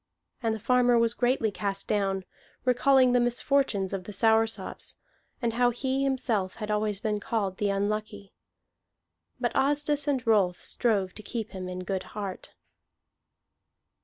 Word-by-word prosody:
And 225 Hz, -2 st, 0 dB
the -, -, -7 dB
farmer 245 Hz, +1 st, +3 dB
was 230 Hz, 0 st, +3 dB
greatly 245 Hz, -3 st, +1 dB
cast 195 Hz, -1 st, -3 dB
down, 195 Hz, -2 st, 0 dB, 0.4 s
recalling 255 Hz, +1 st, +4 dB
the 245 Hz, -, +4 dB
misfortunes 240 Hz, -5 st, +1 dB
of 185 Hz, -2 st, -4 dB
the 210 Hz, -, -7 dB
Soursops, 225 Hz, +2 st, +1 dB, 0.5 s
and 230 Hz, -1 st, +1 dB
how 245 Hz, +1 st, +3 dB
he 265 Hz, +3 st, -1 dB
himself 240 Hz, -8 st, 0 dB
had 210 Hz, -2 st, -6 dB
been -, -, +1 dB
always 210 Hz, -1 st, -1 dB, 0.2 s
called 205 Hz, -3 st, -2 dB
the 205 Hz, -, 0 dB
Unlucky. 205 Hz, 0 st, -2 dB, 1.1 s
But -, -, -1 dB
Asdis 290 Hz, +1 st, +1 dB
and 265 Hz, -4 st, 0 dB
Rolf 200 Hz, -6 st, +3 dB
strove 200 Hz, -6 st, 0 dB
to -, -, -9 dB
keep 225 Hz, +1 st, -5 dB
him 185 Hz, -1 st, -6 dB
in 180 Hz, 0 st, -5 dB
good 190 Hz, +1 st, -2 dB, 0.2 s
heart. 195 Hz, -3 st, -6 dB
220 Hz, 145 wpm, -28 LUFS, 200-245 Hz, 1.1 s, recalling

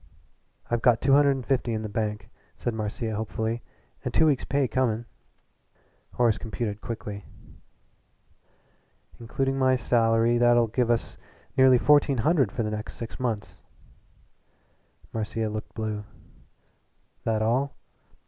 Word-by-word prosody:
"I've 120 Hz, -1 st, +1 dB
got 120 Hz, -2 st, +4 dB
two 135 Hz, 0 st, +3 dB
hundred 140 Hz, -1 st, +5 dB
and 130 Hz, -3 st, -6 dB
fifty 130 Hz, -3 st, 0 dB
in 110 Hz, 0 st, -2 dB
the -, -, -3 dB
bank," 105 Hz, -1 st, -3 dB, 0.3 s
said 120 Hz, -, -3 dB
Marcia 110 Hz, +1 st, -3 dB
hopefully, 110 Hz, +2 st, -2 dB, 0.4 s
"and -, -, -2 dB
two 160 Hz, -, +4 dB
weeks' 145 Hz, -4 st, +2 dB
pay 140 Hz, -1 st, +1 dB
coming." 120 Hz, -1 st, 0 dB, 1.1 s
Horace 120 Hz, -3 st, +2 dB
computed 110 Hz, -2 st, -4 dB
quickly. 105 Hz, -3 st, -6 dB, 2.0 s
"Inducing 135 Hz, +3 st, -1 dB
my 130 Hz, 0 st, +4 dB
salary, 115 Hz, -1 st, +2 dB
that'll 120 Hz, -1 st, +5 dB
give 115 Hz, +2 st, 0 dB
us 120 Hz, -1 st, -1 dB, 0.4 s
nearly 130 Hz, -1 st, +6 dB
fourteen 145 Hz, 0 st, +4 dB
hundred 135 Hz, -, +2 dB
for 120 Hz, -, -2 dB
the 105 Hz, -, -2 dB
next 105 Hz, +1 st, -5 dB
six 115 Hz, -, -7 dB
months." 115 Hz, -5 st, -3 dB, 1.5 s
Marcia 110 Hz, 0 st, -2 dB
looked 110 Hz, 0 st, -6 dB
blue. 110 Hz, -2 st, -3 dB, 1.2 s
"That 110 Hz, -1 st, 0 dB
all? 130 Hz, +5 st, 0 dB
115 Hz, 130 wpm, -26 LUFS, 110-130 Hz, 2.0 s, nearly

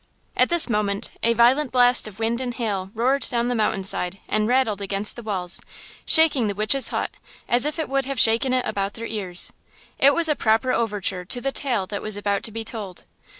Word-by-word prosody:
At -, -, +3 dB
this 345 Hz, -1 st, +3 dB
moment 210 Hz, -3 st, -2 dB
a 230 Hz, -, +2 dB
violent 250 Hz, +5 st, +3 dB
blast 245 Hz, -2 st, +4 dB
of 200 Hz, -3 st, -11 dB
wind 225 Hz, +2 st, -1 dB
and 245 Hz, -2 st, -4 dB
hail 200 Hz, -5 st, -3 dB
roared 260 Hz, +5 st, 0 dB
down 240 Hz, -1 st, -1 dB
the -, -, 0 dB
mountain 215 Hz, -3 st, -1 dB
side 185 Hz, 0 st, 0 dB
and 215 Hz, 0 st, 0 dB
rattled 240 Hz, -5 st, +1 dB
against 200 Hz, +1 st, -2 dB
the 240 Hz, -, -8 dB
walls, 190 Hz, -5 st, -1 dB, 0.5 s
shaking 310 Hz, -8 st, +5 dB
the 200 Hz, -, -3 dB
witch's 215 Hz, +6 st, +3 dB
hut, -, -, -3 dB, 0.4 s
as 240 Hz, +3 st, +3 dB
if 305 Hz, -, -4 dB
it 320 Hz, -, -3 dB
would 275 Hz, -1 st, -1 dB
have 275 Hz, -2 st, -4 dB
shaken 230 Hz, +4 st, +4 dB
it 255 Hz, -1 st, 0 dB
about 200 Hz, 0 st, -3 dB
their 230 Hz, -, -7 dB
ears. 190 Hz, -6 st, -2 dB, 0.5 s
It 280 Hz, +1 st, +5 dB
was 335 Hz, -1 st, +4 dB
a 300 Hz, -, +2 dB
proper 225 Hz, +2 st, +1 dB
overture 205 Hz, -6 st, -2 dB
to 245 Hz, -, -3 dB
the 275 Hz, +2 st, -2 dB
tale 245 Hz, -9 st, -1 dB
that 205 Hz, +1 st, -6 dB
was 215 Hz, -1 st, -2 dB
about 205 Hz, -1 st, -1 dB
to 225 Hz, -, -2 dB
be 225 Hz, +1 st, -5 dB
told. 210 Hz, -5 st, -6 dB
225 Hz, 215 wpm, -22 LUFS, 205-255 Hz, 0.5 s, shaking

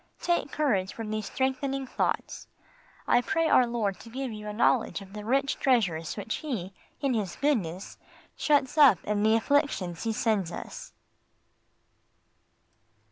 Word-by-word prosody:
Take 345 Hz, -5 st, 0 dB
courage 210 Hz, -11 st, 0 dB
from 220 Hz, -2 st, -5 dB
these 215 Hz, -1 st, -3 dB
strengthening 265 Hz, +1 st, -1 dB
thoughts. -, -, -2 dB, 0.6 s
I 245 Hz, -, +4 dB
pray 325 Hz, +6 st, 0 dB
Our 255 Hz, -5 st, +5 dB
Lord 220 Hz, -5 st, -2 dB
to 230 Hz, -, -12 dB
give 260 Hz, +1 st, -4 dB
you 210 Hz, -1 st, -7 dB
a -, -, -3 dB
knowledge 225 Hz, +1 st, +2 dB
of 195 Hz, -1 st, -13 dB
the 210 Hz, 0 st, -7 dB
rich 270 Hz, +5 st, 0 dB
treasures 195 Hz, -, +1 dB
which 210 Hz, +1 st, -3 dB
He, 210 Hz, -, -4 dB, 0.3 s
in 275 Hz, -3 st, +1 dB
His 205 Hz, -6 st, -2 dB
goodness, 200 Hz, -, -1 dB, 0.4 s
shuts 290 Hz, 0 st, +1 dB
up 270 Hz, -10 st, +8 dB
in 210 Hz, 0 st, -1 dB
the 220 Hz, +1 st, +4 dB
afflictions 225 Hz, -, 0 dB
He 225 Hz, -, -1 dB
sends 210 Hz, -5 st, 0 dB
us. -, -, -8 dB
225 Hz, 145 wpm, -28 LUFS, 205-270 Hz, 0.6 s, up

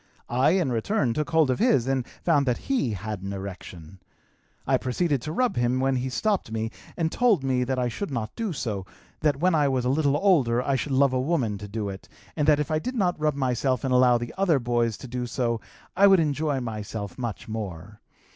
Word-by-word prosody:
I 130 Hz, +6 st, +3 dB
in 180 Hz, -8 st, +1 dB
return 120 Hz, -, 0 dB
took 150 Hz, +3 st, -2 dB
hold 160 Hz, -4 st, +3 dB
of 125 Hz, -, -1 dB
his 125 Hz, -4 st, +3 dB
and 130 Hz, -2 st, -1 dB, 0.2 s
found 145 Hz, -5 st, +3 dB
that 125 Hz, -, +2 dB
he 250 Hz, -, -1 dB
had 105 Hz, 0 st, -5 dB
an 100 Hz, +1 st, -5 dB
erection. 95 Hz, -2 st, -8 dB, 0.7 s
I -, -, +3 dB
proceeded 140 Hz, +1 st, 0 dB
to 150 Hz, -, -5 dB
rub 245 Hz, -, 0 dB
him 120 Hz, +1 st, +1 dB
when 135 Hz, 0 st, +1 dB
he 130 Hz, +1 st, -2 dB
stopped 200 Hz, -, -1 dB
me 110 Hz, 0 st, -2 dB, 0.3 s
and 165 Hz, -2 st, 0 dB
told 225 Hz, -, +3 dB
me 130 Hz, -2 st, +1 dB
that 130 Hz, 0 st, -1 dB
I 125 Hz, -1 st, +1 dB
should 140 Hz, -, -4 dB
not 115 Hz, -6 st, -4 dB
do 225 Hz, -4 st, -2 dB
so, 110 Hz, -, -3 dB, 0.4 s
that 150 Hz, -2 st, +2 dB
when 180 Hz, +4 st, +2 dB
I 150 Hz, -3 st, +3 dB
was 130 Hz, -2 st, 0 dB
a -, -, +2 dB
little 145 Hz, 0 st, +2 dB
older 145 Hz, -11 st, +3 dB
I 135 Hz, +2 st, 0 dB
should 135 Hz, +2 st, -2 dB
love 135 Hz, 0 st, +4 dB
a 130 Hz, -, +1 dB
woman 130 Hz, -9 st, 0 dB
to 105 Hz, -, -7 dB
do 105 Hz, 0 st, -4 dB
it 95 Hz, -1 st, -8 dB, 0.3 s
and 150 Hz, -2 st, 0 dB
that 150 Hz, -1 st, +5 dB
if 150 Hz, +2 st, -2 dB
I 155 Hz, -, +2 dB
did 255 Hz, +10 st, -4 dB
not 180 Hz, -7 st, 0 dB
rub 150 Hz, -1 st, +1 dB
myself 130 Hz, -1 st, 0 dB
and 130 Hz, -1 st, 0 dB
allow 125 Hz, -1 st, +5 dB, 0.2 s
other 180 Hz, -6 st, +3 dB
boys 120 Hz, -3 st, 0 dB
to 130 Hz, -, -9 dB
do 125 Hz, 0 st, -4 dB
so, 115 Hz, -2 st, -1 dB, 0.3 s
I 200 Hz, -, +6 dB
would 195 Hz, -2 st, +6 dB
enjoy 150 Hz, -2 st, 0 dB
myself 110 Hz, -1 st, -5 dB
much 120 Hz, -5 st, -4 dB
more. 105 Hz, -2 st, -6 dB
130 Hz, 220 wpm, -26 LUFS, 115-155 Hz, 0.7 s, I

